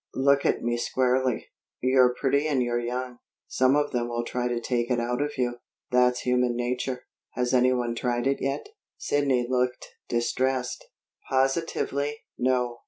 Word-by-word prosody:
"Look 140 +1 +3
at - - 0
me 120 0 0
squarely. 130 0 0 0.3
You're 130 -1 +4
pretty 140 +2 +1
and 135 -4 +2
you're 120 0 0
young. 125 +1 -4 0.3
Some 130 +1 +3
of 145 0 +1
them 120 -2 -1
will 120 0 -2
try 125 0 -2
to 120 -1 -1
take 120 0 -1
it 125 -2 +1
out 125 +2 -1
of 145 0 -2
you. 120 -1 0 0.3
That's 125 0 +3
human 125 -1 +1
nature. 125 +1 -2 0.3
Has 125 0 -1
anyone 125 -1 +3
tried 120 0 -1
it 135 0 +1
yet?" 135 - -2 0.3
Sidney 135 -4 +1
looked 125 0 -1 0.2
distressed. 125 +1 -1 0.4
"Positively, 140 +1 0 0.2
no. 125 -1 0
125 Hz, 155 wpm, -26 LUFS, 120-130 Hz, 0.4 s, You're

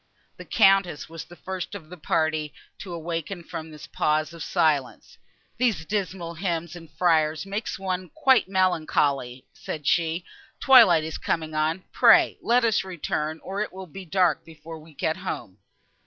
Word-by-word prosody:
The - - -10
Countess 195 -7 +3
was 165 0 -8
the 175 - -14
first 185 +1 -6
of 170 -6 -9
her - - -7
party 155 -2 -1 0.2
to 190 - -8
awaken 170 +1 -4
from 160 0 -7
this 150 -1 -11
pause 155 +1 0
of 170 - -10
silence. 150 -6 -1 0.4
"These 230 -10 +1
dismal 185 -3 -3
hymns 170 -1 -3
and 165 -2 -11
friars 155 -1 +1
make 200 +3 -4
one 185 -1 -3
quite 265 -9 +3
melancholy," 150 -9 0
said 150 -2 -7
she; 170 +2 +1 0.3
"twilight 180 -12 +7
is 160 0 -5
coming 160 -1 -2
on; 155 +4 0
pray - - +5
let 240 +1 +3
us 225 -2 +2
return, 160 -3 -3
or 195 +2 -4
it 210 - -3
will 190 0 -8
be 190 +3 -10
dark 180 -2 +1
before 160 0 -11
we 155 -1 -17
get 160 +4 -1
home." 145 - -6
170 Hz, 160 wpm, -25 LUFS, 155-190 Hz, 0.4 s, twilight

